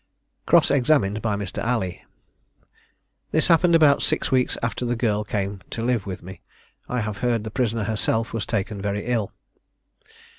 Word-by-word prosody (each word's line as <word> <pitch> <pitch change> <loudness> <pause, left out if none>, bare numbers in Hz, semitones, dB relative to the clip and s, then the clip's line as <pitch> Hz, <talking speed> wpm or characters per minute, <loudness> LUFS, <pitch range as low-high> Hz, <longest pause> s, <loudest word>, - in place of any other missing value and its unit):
Cross - - +5
examined 120 -6 +2
by 110 -3 0
Mr. 100 -2 -4
Alley. 115 -7 -2 1.3
This 155 - +2
happened 170 0 +5
about 150 -3 +5
six - - 0
weeks 130 -1 +2
after 120 +1 -2
the 120 0 0
girl 105 -3 0
came 100 -2 -3
to 115 - -4
live 120 -6 0
with 95 - -6
me. 95 +2 -10 0.5
I 125 -1 -1
have 105 -1 -4
heard 120 -1 0
the 110 - -6
prisoner 115 -2 0
herself 110 +1 -1
was 115 -3 -3
taken 105 -2 -2
very 100 0 -2
ill. 115 -4 -1
110 Hz, 160 wpm, -23 LUFS, 100-125 Hz, 1.3 s, Cross